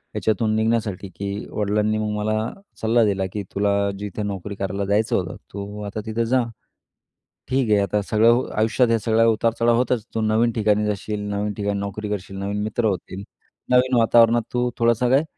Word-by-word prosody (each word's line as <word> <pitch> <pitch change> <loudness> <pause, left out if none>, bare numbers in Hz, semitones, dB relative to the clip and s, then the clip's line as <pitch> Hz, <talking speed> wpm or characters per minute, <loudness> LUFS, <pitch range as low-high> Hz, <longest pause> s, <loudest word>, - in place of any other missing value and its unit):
याच्यातून 110 0 +1
निघण्यासाठी, 110 -3 0
की 100 +2 -4
वडिलांनी 105 +1 0
मग 110 0 -1
मला 110 +2 -1 0.3
सल्ला 115 +1 +3
दिला, 95 -2 0
की 105 -1 -3
"तुला 100 0 +1
जिथे 105 +1 -4
नोकरी 100 0 -4
करायला 100 0 -3
जायचं 105 +3 +1
होतं, 90 -2 -2 0.2
तू 100 +1 -6
आता 105 +1 -5
तिथे 110 +1 -1
जा. 130 +2 +2 1.1
ठीक 130 -3 +1
आहे, 105 - +5
आता 105 +1 0
सगळं 115 +4 +3
आयुष्यात, 115 +3 +2
हे 115 -1 +3
सगळा 110 +2 +2
उतार-चढाव 115 +1 +2
होतच. 125 -2 0
तू 110 - 0
नवीन 110 +2 +2
ठिकाणी 105 -1 +2
जाशील, 105 0 -3
नवीन 105 +1 -2
ठिकाणी 100 -1 -2
नोकरी 100 +1 -4
करशील, 100 -1 -5
नवीन 100 +1 -3
मित्र 110 +2 -1
होतील. 95 -1 -2 0.5
नवीन 125 0 +4
वातावरणात 115 +1 +5
तू 125 0 +1
थोडंसं 115 +1 +3
काही 135 +4 +4
105 Hz, 170 wpm, -22 LUFS, 100-115 Hz, 1.1 s, आहे